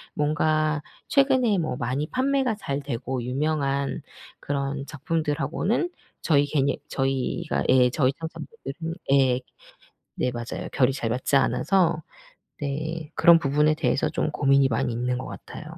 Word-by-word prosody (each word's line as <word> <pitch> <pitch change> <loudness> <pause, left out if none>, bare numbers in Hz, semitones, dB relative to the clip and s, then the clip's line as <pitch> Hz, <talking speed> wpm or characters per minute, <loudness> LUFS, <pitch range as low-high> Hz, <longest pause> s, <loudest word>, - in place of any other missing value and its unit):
뭔가 155 0 +1 0.3
최근에 260 -7 +3
뭐 155 -6 -2
많이 130 +6 -2
판매가 260 -3 +1
잘 140 -8 -3
되고 130 -1 -3
유명한 140 +2 -1 0.4
그런 140 0 -3
작품들하고는 165 - -1 0.3
저희 145 -3 +3
괜히 140 0 0
저희가 135 +5 -1
예. 125 -1 +6
저희 130 -1 +2
상사분들은 165 -1 -6 0.2
예. 130 -2 +4 0.8
네 125 - 0
맞아요. 120 -1 -5
결이 130 0 +3
잘 130 -4 -3
맞지 125 +4 +2
않아서 170 +2 +2 0.6
네 155 +2 -4
그런 170 -1 +7
부분에 150 0 +2
대해서 155 -3 +1
좀 155 - -1
고민이 140 -2 +4
많이 115 0 0
있는 125 +2 -1
것 - - -6
같아요. - - -9
145 Hz, 280 characters per minute, -25 LUFS, 135-165 Hz, 0.8 s, 그런